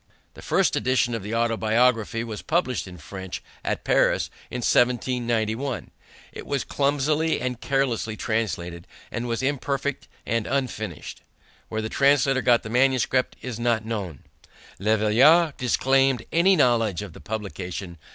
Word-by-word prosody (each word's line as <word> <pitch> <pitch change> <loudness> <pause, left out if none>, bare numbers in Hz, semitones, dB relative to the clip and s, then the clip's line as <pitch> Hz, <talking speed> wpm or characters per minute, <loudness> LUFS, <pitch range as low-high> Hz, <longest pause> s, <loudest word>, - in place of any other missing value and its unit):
The - - -13
first - - +2
edition 125 -1 +1
of 115 - -2
the 105 +4 -4
Autobiography 115 0 +1
was 110 -3 -6
published 155 - -1
in 90 -1 -10
French 95 +3 -7 0.2
at - - -2
Paris - - +2 0.2
in 125 - -4
1791. 120 0 0 0.4
It - - -9
was 140 -2 -1
clumsily 145 +3 +1
and 125 -1 -3
carelessly 125 -5 -1
translated, 85 -7 -3 0.2
and 120 +1 -3
was 115 +2 -2
imperfect 140 0 -2 0.2
and 115 -1 -1
unfinished. 110 - -3 0.5
Where 110 0 -3
the - - -2
translator 135 0 +3
got 120 -1 +3
the 110 - -7
manuscript 130 0 +2
is 125 -3 -5
not 115 -2 +1
known. 100 - -5 0.6
Le 110 +3 +2
Veillard 140 +10 +5
disclaimed 135 0 +2
any 180 +4 +4
knowledge 115 - +2
of 100 -5 -9
the - - -13
publication. 95 -5 -6
120 Hz, 140 wpm, -24 LUFS, 110-135 Hz, 0.6 s, Veillard